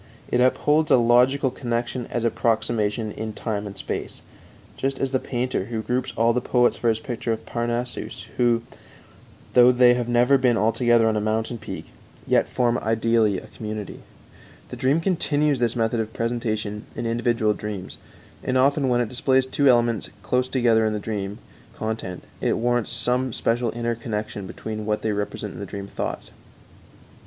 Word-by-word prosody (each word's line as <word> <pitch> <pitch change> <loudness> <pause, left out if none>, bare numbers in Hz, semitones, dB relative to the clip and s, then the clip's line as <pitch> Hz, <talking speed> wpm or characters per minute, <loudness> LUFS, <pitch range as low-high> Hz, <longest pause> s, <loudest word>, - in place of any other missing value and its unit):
It 125 - +3
upholds 150 +4 +3
a - - +7
logical 125 +3 +4
connection 120 0 -3
as 120 - -3
approximation 110 -2 0
in 110 +1 -5
time 105 -2 -3
and 100 -1 -9
space, - - -5 0.5
just 135 0 -2
as 135 -1 -1
the 130 - +2
painter, 125 -6 -2
who 110 0 -4
groups 125 +4 -1
all 115 +1 +4
the 125 - 0
poets 125 0 +3
for 120 - 0
his 110 - +2
picture 115 -1 -3
of 110 0 -3
Parnassus 120 +1 -3
who, 120 -1 +3 0.9
though 125 0 +7
they 125 0 +6
have 120 -1 -2
never 125 +3 +4
been 125 -3 +3
all 110 +1 +3
together 120 0 +3
on 110 - +2
a 105 - 0
mountain 110 +2 -1
peak, - - -8 0.3
yet - - +3
form 120 -1 +1
ideally 110 -2 +2
a 110 - -8
community. 110 -2 -6 0.7
The - - -6
dream 140 +5 +2
continues 150 -6 +1
this 120 -1 +1
method 115 0 0
of 110 0 -3
presentation 110 -3 -2
in - - -4
individual 115 -2 +1
dreams, 105 -3 -6 0.5
and 130 - +1
often 140 +1 +3
when 120 0 +3
it 120 - -1
displays 130 +1 +2
two 140 +2 +1
elements 120 -3 +2
close 125 0 0
together 120 -4 +3
in 110 -1 +1
the 105 - -2
dream 100 -1 -4 0.4
content 110 -5 -4 0.2
it - - +1
warrants 120 0 0
some 125 0 0
special 115 +1 0
inner 120 0 -1
connection 105 -3 -4
between 110 +3 -6
what 105 0 -1
they 110 - +1
represent 105 0 -3
in - - -9
the - - -4
dream 100 -1 -6
thoughts. 100 - -5
120 Hz, 175 wpm, -24 LUFS, 110-125 Hz, 0.9 s, a